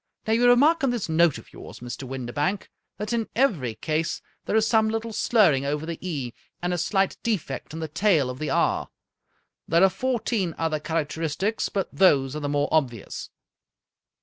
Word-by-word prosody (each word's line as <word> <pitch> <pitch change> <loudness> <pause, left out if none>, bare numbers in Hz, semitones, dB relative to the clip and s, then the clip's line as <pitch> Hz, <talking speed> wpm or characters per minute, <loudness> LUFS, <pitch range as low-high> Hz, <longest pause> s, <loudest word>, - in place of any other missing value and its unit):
Now, 220 - +1
you 245 +2 +5
re 245 - +8
mark 315 +6 +4
in 270 - +2
this 240 -4 -2
note 160 -2 +3
of - - -14
yours, - - -10
Mr. 125 +2 -7
Windibank, 135 +9 -3 0.3
that 210 +4 -3
in 230 -2 -1
every 175 - +1
case 155 +7 -1 0.3
there - - -1
is 220 0 +4
some 220 -1 +3
little 225 0 -3
slurring 190 - +3
over 145 +2 -2
the 165 0 -5
e, 140 -10 -4 0.3
and 175 0 -1
a - - -1
slight 195 +2 +1
defect 215 -8 -3
in 160 +1 -6
the 160 - -2
tail 160 -3 +2
of 130 - -9
the 155 - -2
r. - - +1 0.8
There 170 +2 +4
are 195 - +7
fourteen 230 -7 -1
other 160 -2 -1
char 160 0 -1
acteristics, 165 +8 -2
but 195 -2 -2
those 140 -8 +4
are - - -2
the 145 -1 -3
more 145 0 +1
obvious." 125 -9 -1
170 Hz, 190 wpm, -25 LUFS, 145-220 Hz, 0.8 s, re